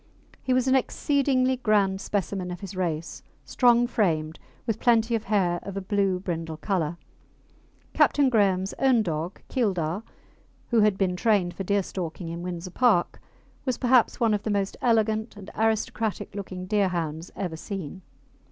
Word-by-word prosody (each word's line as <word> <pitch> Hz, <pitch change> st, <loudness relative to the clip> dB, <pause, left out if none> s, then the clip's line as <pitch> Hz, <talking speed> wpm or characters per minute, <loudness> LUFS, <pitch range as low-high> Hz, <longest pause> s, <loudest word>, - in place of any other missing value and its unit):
He 260 Hz, -, -2 dB
was 255 Hz, 0 st, +2 dB
an 260 Hz, -, +4 dB
exceedingly 260 Hz, -1 st, +2 dB
grand 200 Hz, -5 st, +2 dB
specimen 195 Hz, -2 st, -2 dB
of 175 Hz, -1 st, -6 dB
his 195 Hz, -1 st, -7 dB
race, 170 Hz, -3 st, -3 dB, 0.2 s
strong 240 Hz, -1 st, +4 dB
framed, 160 Hz, -9 st, 0 dB, 0.3 s
with 225 Hz, -2 st, -1 dB
plenty 235 Hz, -1 st, +3 dB
of 225 Hz, -1 st, -1 dB
hair 185 Hz, -4 st, +1 dB
of 200 Hz, -1 st, -7 dB
a -, -, -2 dB
blue 195 Hz, -1 st, 0 dB
brindle 165 Hz, -3 st, -4 dB
colour. 170 Hz, -2 st, -1 dB, 1.0 s
Captain 285 Hz, -2 st, +4 dB
Graham's 195 Hz, -5 st, +2 dB
own 260 Hz, -4 st, +4 dB
dog 165 Hz, 0 st, -4 dB
Keildar, 190 Hz, -, -1 dB, 0.7 s
who 235 Hz, -, +3 dB
had 210 Hz, -2 st, +3 dB
been 185 Hz, -2 st, +1 dB
trained 185 Hz, -3 st, +2 dB
for 195 Hz, -, -5 dB
deerstalking 185 Hz, -3 st, -2 dB
in 170 Hz, +1 st, -5 dB
Windsor 180 Hz, 0 st, -5 dB
Park, 215 Hz, -4 st, +2 dB, 0.4 s
was 255 Hz, -3 st, -1 dB
perhaps 250 Hz, -2 st, +3 dB
one 230 Hz, -2 st, +3 dB
of 205 Hz, -, 0 dB
the 220 Hz, -, -4 dB
most 200 Hz, -1 st, 0 dB
elegant 220 Hz, -2 st, +1 dB
and 200 Hz, -1 st, -10 dB
aristocratic 220 Hz, -1 st, -1 dB
looking 185 Hz, -2 st, -6 dB
Deerhounds 175 Hz, -5 st, -1 dB
ever 180 Hz, -5 st, -3 dB
seen. 190 Hz, 0 st, -6 dB
200 Hz, 150 wpm, -26 LUFS, 180-225 Hz, 1.0 s, an